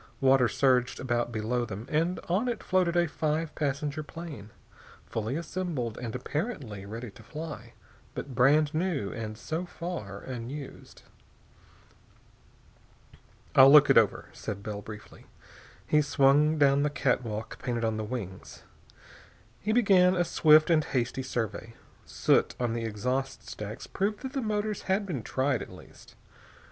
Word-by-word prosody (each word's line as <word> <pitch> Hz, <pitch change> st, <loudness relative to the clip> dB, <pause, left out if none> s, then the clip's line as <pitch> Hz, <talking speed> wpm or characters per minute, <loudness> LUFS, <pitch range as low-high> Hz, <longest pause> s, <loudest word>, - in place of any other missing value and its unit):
Water 135 Hz, -2 st, +5 dB
surged 125 Hz, +1 st, +2 dB
about 120 Hz, -2 st, -1 dB
below 115 Hz, +2 st, -1 dB
them, 110 Hz, -1 st, -6 dB
and 165 Hz, +5 st, 0 dB
on 190 Hz, +8 st, +1 dB
it 235 Hz, -4 st, -3 dB
floated 180 Hz, -2 st, +2 dB
a 175 Hz, 0 st, +3 dB
five 155 Hz, +1 st, -2 dB
passenger 145 Hz, +1 st, -2 dB
plane, 150 Hz, -9 st, -9 dB, 0.6 s
fully 115 Hz, +4 st, -3 dB
assembled 165 Hz, -9 st, -3 dB
and 120 Hz, -2 st, -5 dB
apparently 130 Hz, -, -4 dB
ready 115 Hz, +2 st, -7 dB
to 105 Hz, -, -15 dB
fly, 140 Hz, 0 st, -8 dB, 0.4 s
but 135 Hz, -, -6 dB
brand 145 Hz, +5 st, +4 dB
new 155 Hz, -, -1 dB
and 110 Hz, -1 st, -5 dB
so 160 Hz, +8 st, -3 dB
far 170 Hz, -, -6 dB
unused. 130 Hz, +3 st, -8 dB, 2.5 s
"I'll 135 Hz, +1 st, +9 dB
look 150 Hz, -1 st, +8 dB
it 135 Hz, -, +5 dB
over," 110 Hz, -, 0 dB
said 100 Hz, -2 st, -6 dB
Bell, 105 Hz, -1 st, -5 dB
briefly. 105 Hz, 0 st, -11 dB, 0.6 s
He 150 Hz, -, +3 dB
swung 145 Hz, +1 st, +3 dB
down 140 Hz, -1 st, +4 dB
the 150 Hz, -, +2 dB
catwalk 120 Hz, -6 st, -2 dB
painted 120 Hz, -2 st, -2 dB
on 110 Hz, -1 st, -1 dB
the 110 Hz, -, -2 dB
wings. 105 Hz, -5 st, -7 dB, 1.0 s
He 210 Hz, -, -1 dB
began 190 Hz, -5 st, +5 dB
a 175 Hz, -, +2 dB
swift 155 Hz, 0 st, +5 dB
and 155 Hz, -2 st, +4 dB
hasty 130 Hz, -1 st, -1 dB
survey. 115 Hz, -2 st, -4 dB, 0.3 s
Soot -, -, +2 dB
on 120 Hz, -2 st, 0 dB
the 115 Hz, -1 st, -2 dB
exhaust 125 Hz, +5 st, -3 dB
stacks 105 Hz, 0 st, -7 dB
proved 205 Hz, +2 st, -2 dB
that 265 Hz, 0 st, -5 dB
the 275 Hz, -, -1 dB
motors 210 Hz, -2 st, -2 dB
had 195 Hz, +2 st, +2 dB
been 160 Hz, -11 st, -3 dB
tried, 130 Hz, +1 st, 0 dB
at -, -, -7 dB
least. -, -, -15 dB
135 Hz, 145 wpm, -28 LUFS, 115-165 Hz, 2.5 s, I'll